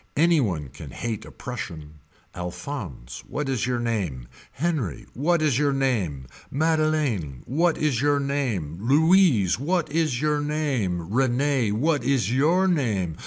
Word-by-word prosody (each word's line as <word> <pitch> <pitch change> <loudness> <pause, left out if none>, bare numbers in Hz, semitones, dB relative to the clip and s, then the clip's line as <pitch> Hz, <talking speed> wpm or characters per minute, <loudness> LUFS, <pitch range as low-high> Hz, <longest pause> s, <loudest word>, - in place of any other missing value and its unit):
Any 165 0 +4
one 80 - -2
can - - -10
hate 115 -3 -4
a - - -11
Prussian. 80 -11 -7 0.3
Alphonse 90 - -6
what 150 -1 -3
is 130 -3 -1
your 125 -1 0
name. 100 - -2 0.3
Henri 140 - -2
what 160 +5 +1
is 140 -4 +2
your 145 -1 +2
name. 105 - -1 0.2
Madeleine 155 - 0
what 165 +5 +1
is 140 -6 +1
your 145 0 +3
name. 120 - -2
Louise 145 - +4
what 165 +2 0
is 155 -6 +1
your 150 0 +1
name. 125 - -1
Rene 130 -2 +2
what 145 +4 +1
is 120 -5 +1
your 165 +8 +3
name. 110 - 0
130 Hz, 140 wpm, -25 LUFS, 100-150 Hz, 0.3 s, Any